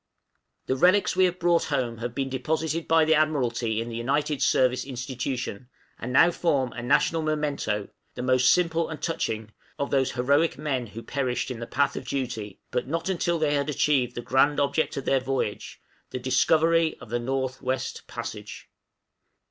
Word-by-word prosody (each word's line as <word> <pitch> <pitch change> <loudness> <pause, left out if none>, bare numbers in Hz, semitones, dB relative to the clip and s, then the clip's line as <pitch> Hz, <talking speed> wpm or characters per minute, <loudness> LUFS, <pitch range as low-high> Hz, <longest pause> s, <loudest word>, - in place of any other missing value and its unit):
The 130 - 0
relics 180 +8 +3
we 185 - +5
have 180 0 -1
brought 170 -1 +2
home 125 -6 -2
have 120 0 -5
been 135 -1 -1
deposited 160 +5 -2
by 165 -1 +4
the 160 - +4
Admiralty 125 -8 +1
in 115 - -3
the 115 - -6
United 140 +4 -1
Service 130 -1 +3
Institution, 125 -2 -4 0.3
and 125 - -5
now 165 +6 +6
form 140 -8 0
a 120 - -6
national 145 +6 +2
memento 145 -9 -1 0.3
the 125 - -4
most 130 0 +4
simple 170 -2 +1
and 160 - -5
most - - -4
touching 110 -9 -3 0.3
of 140 -1 -3
those 135 -1 +1
heroic 140 +6 +2
men 135 -5 -2
who 115 +3 -9
perished 130 -2 -2
in 120 - -6
the 115 - -6
path 140 0 +1
of - - -6
duty, 120 -7 -4
but 125 0 -1
not 165 +5 -2
until 170 -2 0
they 155 -2 +1
had 140 0 0
achieved 130 -4 +1
the 120 - -3
grand 140 +4 +3
object 145 +2 0
of 135 - -4
their 135 - +3
voyage, 130 -5 -3 0.3
the - - -4
Discovery 160 +6 +2
of 115 - -12
the 120 - 0
North 130 +1 -2
West 130 +1 -3
Passage. - - -7
135 Hz, 180 wpm, -26 LUFS, 125-155 Hz, 0.3 s, now